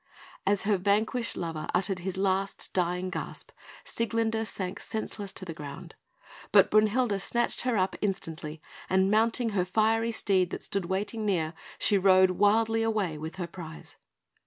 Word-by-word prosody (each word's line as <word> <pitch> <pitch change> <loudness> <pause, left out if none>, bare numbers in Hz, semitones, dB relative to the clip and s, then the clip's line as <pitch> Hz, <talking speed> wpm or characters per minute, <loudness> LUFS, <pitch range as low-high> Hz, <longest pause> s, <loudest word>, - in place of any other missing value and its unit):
As 200 0 +3
her 205 -1 +2
vanquished 215 +5 +1
lover 165 -3 -4
uttered 190 +1 0
his 185 +1 -4
last 195 0 -1
dying 180 0 0
gasp, - - -6 0.3
Sieglinde 225 -1 -1
sank 185 -3 -4
senseless 210 -2 -4
to 185 - -5
the 165 - -5
ground; 145 -2 -9 0.6
but - - +6
Brünhilde 215 0 +3
snatched 240 +4 0
her 250 -3 0
up 185 0 +1
instantly, 165 -6 -4 0.3
and 190 +1 +3
mounting 230 +2 +2
her 200 -4 +1
fiery 225 +4 +2
steed 190 -5 +1
that - - -5
stood 200 -3 -1
waiting 205 +5 -2
near, 170 -6 0 0.2
she 205 -2 +3
rode 185 -1 +6
wildly 225 +4 +3
away 210 -8 0
with 160 +3 -6
her 185 -2 -3
prize. 165 -2 -10
195 Hz, 155 wpm, -28 LUFS, 180-220 Hz, 0.6 s, but